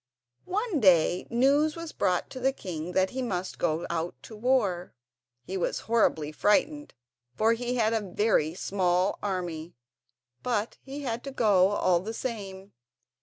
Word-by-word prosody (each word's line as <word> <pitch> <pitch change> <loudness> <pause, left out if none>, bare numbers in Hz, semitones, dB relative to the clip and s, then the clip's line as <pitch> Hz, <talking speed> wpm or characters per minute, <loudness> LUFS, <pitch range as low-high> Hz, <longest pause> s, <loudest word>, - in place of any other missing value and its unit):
One 410 -3 0
day 180 -4 +4
news 280 +6 +3
was 335 -1 -6
brought 180 -1 0
to 260 - -6
the 265 +1 +2
king 180 -8 -6
that 190 0 +2
he 260 - -3
must 190 -7 -3
go 165 0 0
out 170 0 -3
to 220 - -10
war. 210 - 0 0.5
He 190 +8 -4
was 180 - -1
horribly 185 -10 +1
frightened 290 - +1 0.4
for 220 - +3
he 245 +2 -2
had 225 -2 +2
a 225 - +1
very 185 -5 +1
small 185 -1 0
army, 175 -4 -4 0.7
but 230 -3 -2
he 280 +2 -7
had 240 -2 -3
to 275 - -5
go 205 -7 +4
all 185 -3 +2
the 220 +5 -6
same. 200 -6 -6
205 Hz, 155 wpm, -28 LUFS, 180-250 Hz, 0.7 s, day